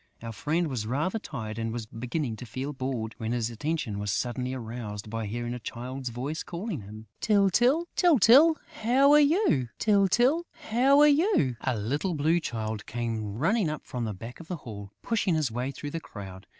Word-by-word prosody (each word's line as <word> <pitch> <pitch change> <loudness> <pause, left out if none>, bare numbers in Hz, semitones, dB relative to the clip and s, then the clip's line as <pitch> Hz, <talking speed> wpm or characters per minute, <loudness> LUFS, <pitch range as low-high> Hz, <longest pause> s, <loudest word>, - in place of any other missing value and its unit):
Our 115 - -5
friend 160 +9 0
was 120 -7 -3
rather 150 - -1
tired 110 - -6
and 115 0 -2
was 115 -1 -4
beginning 120 +3 -3
to 125 - -8
feel 135 +5 -4
bored, 130 -4 -3
when 110 +1 -2
his 120 -1 -1
attention 135 -4 -2
was 105 0 -3
suddenly 125 +2 -2
aroused 110 -4 -6
by 115 -1 -3
hearing 120 +3 -3
a 125 - -5
Child's 125 +3 -5
voice 130 +7 -4
calling 175 - -5
him: 105 +2 -10 0.2
"Tyltyl!... 230 - +3
Tyltyl!... 310 - +6 0.3
How 260 +5 +5
are 295 - +8
you, 295 - +3
Tyltyl, 240 - +3 0.3
how 265 +5 +5
are 300 - +8
you?..." 290 - +3
A 130 -3 -1
little 145 - -1
Blue 160 +4 +2
Child 110 -7 -4
came 110 -3 -3
running 200 - +2
up 150 -1 -5
from 125 -2 -4
the 110 - -3
back 115 +6 -9
of 170 - -11
the 180 - -4
hall, 100 -3 -8
pushing 205 -7 +1
his 150 -6 0
way 125 +3 -2
through 145 +2 -6
the 165 - -3
crowd. 95 - -10
130 Hz, 190 wpm, -28 LUFS, -, 0.3 s, are